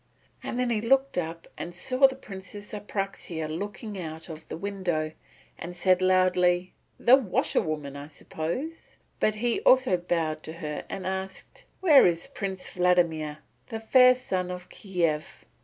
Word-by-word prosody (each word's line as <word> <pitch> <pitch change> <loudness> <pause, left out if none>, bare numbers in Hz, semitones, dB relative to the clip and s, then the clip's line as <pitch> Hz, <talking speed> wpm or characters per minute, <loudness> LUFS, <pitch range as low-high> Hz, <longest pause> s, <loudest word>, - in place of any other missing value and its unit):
Then 245 0 -1
he 215 -2 +1
looked 270 +4 +2
up 165 0 -5
and 175 +1 -6
saw 255 +8 +4
the 265 - -6
Princess 205 -3 -10
Apraxia 195 -6 -4
looking 205 +5 -5
out 160 0 -7
of 160 0 -9
the - - -6
window 175 -5 -2 0.5
and 175 +1 -6
said 185 +1 +4
out 185 - +3
loudly, 180 -1 +3 0.3
"The 245 - +7
washerwoman, 155 - -1
I 140 0 -7
suppose." 170 - -5 0.2
But 215 - +2
he 235 +2 0
also 255 -7 +5
bowed 165 -3 -1
to 160 - -7
her 155 -3 -5
and 195 -1 -5
asked, 190 0 -5 0.2
"Where 310 - +7
is 170 -1 0
Prince 190 -2 -5
Vladimir, 170 -4 +1 0.2
the 225 - -5
Fair 255 +3 +6
Sun 185 -7 -2
of 180 0 -7
Kiev?" 170 -6 -2
185 Hz, 150 wpm, -27 LUFS, 165-215 Hz, 0.5 s, The